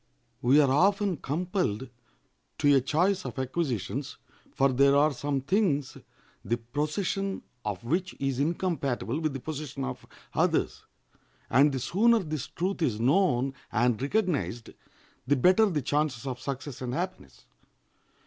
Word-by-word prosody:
We 130 +5 +5
are 140 -3 +4
often 195 +4 +3
compelled 150 - -2 0.7
to 145 -1 +4
a 135 - +4
choice 180 +8 +1
of - - -7
acquisitions, 130 - -2 0.3
for 135 0 +2
there 140 +2 +5
are 145 +1 +4
some 140 +1 -2
things 150 -3 +1 0.5
the 120 - 0
possession 155 - -2 0.2
of 105 -2 -4
which 175 +9 -1
is 135 -2 -1
incompatible 150 -5 -1
with 155 -3 -1
the 135 - -4
possession 150 +1 -5
of 65 0 -6 0.3
others, - - 0 0.7
and 140 +4 +5
the 135 - -2
sooner 225 - +3
this 155 - -3
truth 185 +2 -3
is 115 -9 0
known 135 -1 +2 0.2
and 120 0 +1
recognized 145 - -1 0.6
the 145 - +4
better 185 - +5
the 155 -8 -1
chances 145 -2 -1
of 130 -2 -4
success 135 +1 -6
and 125 0 -3
happiness. 70 - -5
145 Hz, 140 wpm, -28 LUFS, 125-175 Hz, 0.7 s, We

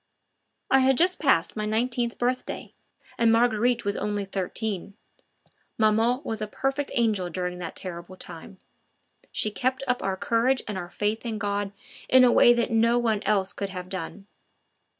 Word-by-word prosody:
I 270 - +6
had 265 0 +3
just 365 +2 +3
passed 265 - +2
my 215 -1 -2
nineteenth 235 +2 -1
birthday, 250 +1 -3 0.5
and 230 -1 +4
Marguerite 235 0 +2
was 200 - 0
only 205 0 -2
thirteen. 195 0 -3 0.8
Maman 225 +4 +3
was 220 -1 -4
a 215 - -2
perfect 270 +5 -2
angel 215 -7 +1
during 180 0 -4
that 170 -2 -6
terrible 180 0 -7
time; 175 +3 -9 0.7
she 215 - 0
kept 260 +4 -1
up 250 -1 0
our 190 -1 -2
courage 235 +6 +1
and 210 - -3
our 175 -2 -5
faith 210 +3 -2
in 230 -3 -3
God 205 -1 -2 0.4
in 260 0 +7
a 245 - +6
way 240 - +7
that 240 0 +1
no 230 +1 +3
one 225 -4 +1
else 195 -2 +1
could 200 - -4
have 185 -1 -7
done. 190 +2 -6
215 Hz, 165 wpm, -26 LUFS, 195-245 Hz, 0.8 s, in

